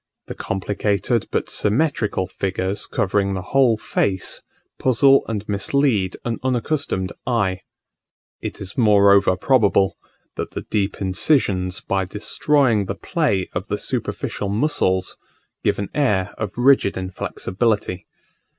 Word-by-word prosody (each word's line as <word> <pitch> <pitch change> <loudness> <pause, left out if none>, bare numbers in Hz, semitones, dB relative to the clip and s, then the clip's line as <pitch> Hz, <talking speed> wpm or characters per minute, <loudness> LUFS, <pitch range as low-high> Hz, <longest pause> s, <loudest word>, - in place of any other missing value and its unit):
The - - -6
complicated 100 +3 -1
but - - -1
symmetrical 110 -4 0
figures 95 +2 -2
covering 100 0 0
the 95 - -4
whole 130 -5 +4
face, 95 -3 -2 0.4
puzzle 135 +2 +4
and 105 -2 -4
mislead 105 -1 +1
an 115 -1 -2
unaccustomed 125 -6 -1
eye: 100 -7 +1 0.8
it - - -5
is 95 0 -6
moreover 100 -4 +5
probable, 100 -7 +2 0.4
that - - -4
the - - -5
deep 100 -2 -2
incisions, 95 - +1
by 95 -1 -1
destroying 110 +3 +1
the 100 - -4
play 105 - 0
of - - -4
the - - -2
superficial 100 - -3
muscles, 100 -6 0 0.5
give - - +1
an 100 - -4
air 100 -10 +1
of 105 -1 -5
rigid 125 -5 +4
inflexibility. 95 +2 -2
100 Hz, 120 wpm, -21 LUFS, 95-125 Hz, 0.8 s, moreover